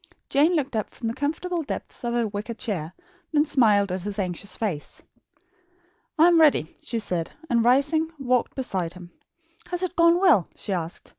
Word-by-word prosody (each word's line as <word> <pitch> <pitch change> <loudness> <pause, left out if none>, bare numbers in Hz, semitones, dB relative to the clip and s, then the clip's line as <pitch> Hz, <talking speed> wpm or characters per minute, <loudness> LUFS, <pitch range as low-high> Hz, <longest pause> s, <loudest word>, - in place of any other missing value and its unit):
Jane 305 +6 +3
looked 275 -5 -1
up 215 - -1
from 230 - -6
the - - -3
comfortable 320 +6 -2
depths 290 - -7
of 240 0 -1
her 235 -2 +1
wicker 210 +3 -5
chair; 180 -8 -4 0.4
then 300 -1 +3
smiled 210 - +3
at 185 0 -2
his 205 +2 -4
anxious 185 0 -2
face. 185 -10 -4 1.1
"I 320 - +6
am 340 -2 +5
ready," 285 - +3
she 235 - -3
said, 180 -6 -2 0.2
and 235 -1 +3
rising, 285 +6 +3
walked 255 -3 0
beside 185 -10 -2
him. 180 -1 -12 0.6
"Has 355 0 -2
it 365 -1 -3
gone 335 +1 +5
well?" 330 - +4
she 200 - -4
asked. 170 -2 -5
235 Hz, 175 wpm, -25 LUFS, 195-305 Hz, 1.1 s, I